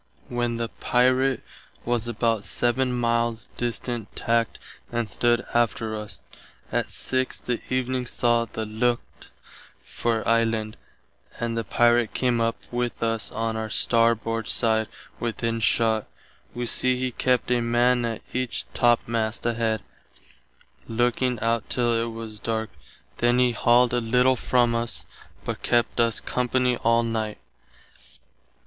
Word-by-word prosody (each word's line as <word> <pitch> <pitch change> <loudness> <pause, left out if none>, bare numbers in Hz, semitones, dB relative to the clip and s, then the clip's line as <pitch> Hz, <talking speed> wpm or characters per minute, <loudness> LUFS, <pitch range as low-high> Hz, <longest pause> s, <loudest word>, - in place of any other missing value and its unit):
When 120 -1 -1
the 115 -1 -2
Pirate 130 +1 +2 0.4
was 120 -1 0
about 115 -2 0
7 125 +4 +1
miles 115 -2 0
distant 120 -2 -3
tackt 115 -1 0 0.3
and 120 -1 -1
stood 120 +2 +1
after 115 -2 +1
us. 105 -1 -6 0.5
Att - - 0
6 130 0 -2
that 120 0 -4
evening 130 -1 0
saw 120 -1 +2
the 110 0 -5
lookt 120 +3 -2 0.6
for 115 -2 -2
island, 115 -2 +1 0.6
and 115 -1 -2
the 115 - -1
Pirate 120 0 +3
came 125 -2 +1
up 115 0 +1 0.2
with 120 -1 -2
us 115 -1 0
on 115 0 -2
our 110 0 -3
starboard 115 -1 +2
side 110 -2 +2 0.3
within 115 0 -2
shott. 110 -1 +2 0.5
Wee 120 0 -2
see 130 +2 +1
he 130 0 -1
kept 125 +1 +1
a 120 -1 +3
man 120 +1 +3
at 115 -2 -3
each 130 -1 -1
topmast 115 -2 +1
head, 115 -2 0 1.0
looking 120 +1 +1
out 115 0 0
till 120 -1 +1
it 115 0 0
was 110 -2 -7
darke, 110 0 -2 0.5
then 120 +1 +3
he 125 -1 +4
halled 120 +1 +4
a 120 - +2
little 125 +3 +3
from 120 -1 +2
us, 115 0 -2 0.4
but - - -4
kept 120 -1 +1
us 115 -1 +3
company 125 0 +1
all 115 +1 +3
night. 110 -2 -2
115 Hz, 135 wpm, -25 LUFS, 115-120 Hz, 1.0 s, he